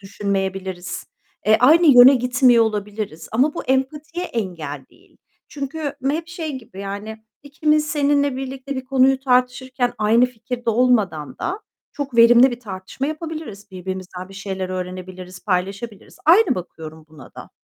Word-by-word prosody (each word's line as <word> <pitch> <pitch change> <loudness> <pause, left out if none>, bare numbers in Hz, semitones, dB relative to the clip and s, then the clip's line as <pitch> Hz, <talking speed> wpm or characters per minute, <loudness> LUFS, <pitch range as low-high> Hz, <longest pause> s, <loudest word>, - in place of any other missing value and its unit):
düşünmeyebiliriz, 195 -2 -4 0.4
eee, 215 0 +6
aynı 320 +7 +6
yöne 260 +3 +10
gitmiyor 250 -2 +4
olabiliriz. 210 -6 -4
Ama 265 +7 +2
bu - - -5
empatiye 300 +6 -2
engel 165 - -5
değil. - - -25 0.3
Çünkü 285 +1 -5 0.2
hep 330 +3 -3
şey 330 -4 -5
gibi, 225 -5 -12
yani, 210 +2 -7 0.2
ikimiz 300 +1 +1
seninle 285 -2 +1
birlikte 270 +1 -6
bir 260 - -5
konuyu 265 0 +3
tartışırken 255 -1 0
aynı 225 +4 +4
fikirde 240 0 -4
olmadan 205 - +1
da 385 +5 -3 0.3
çok 275 -4 -5
verimli 240 +3 +7
bir 240 0 -7
tartışma 195 +5 -6
yapabiliriz. 310 - -7
Birbirimizden 185 0 -7
bir 195 - -13
şeyler 190 -1 -5
öğrenebiliriz, 185 0 -7
paylaşabiliriz. 200 +3 -3
Aynı 350 0 +5
bakıyorum 160 -4 -9
buna 155 -3 -15
da. - - -11
235 Hz, 135 wpm, -21 LUFS, 190-270 Hz, 0.4 s, yöne